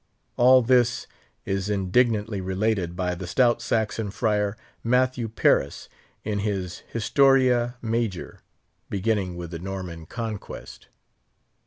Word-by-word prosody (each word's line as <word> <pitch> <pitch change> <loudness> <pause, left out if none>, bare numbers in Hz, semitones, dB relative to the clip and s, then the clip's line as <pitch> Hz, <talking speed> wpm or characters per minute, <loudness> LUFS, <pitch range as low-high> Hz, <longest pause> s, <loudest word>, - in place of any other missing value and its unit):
All 130 +1 +6
this 125 0 +3 0.4
is 95 0 -2
indignantly 105 +1 +1
related 95 -1 -1
by 90 0 -1
the 90 0 -6
stout 120 +5 +3
Saxon 110 -1 -1
friar, 105 0 0 0.3
Matthew 125 -1 +1
Paris, 70 -9 +1 0.3
in 105 -1 -2
his 100 -4 -3
Historia 125 0 +3
Major, 115 -4 -2 0.5
beginning 100 -3 -1
with 85 -1 -7
the 85 - -5
Norman 90 -3 -6
Conquest. 110 -2 -7
105 Hz, 110 wpm, -25 LUFS, 95-120 Hz, 0.5 s, All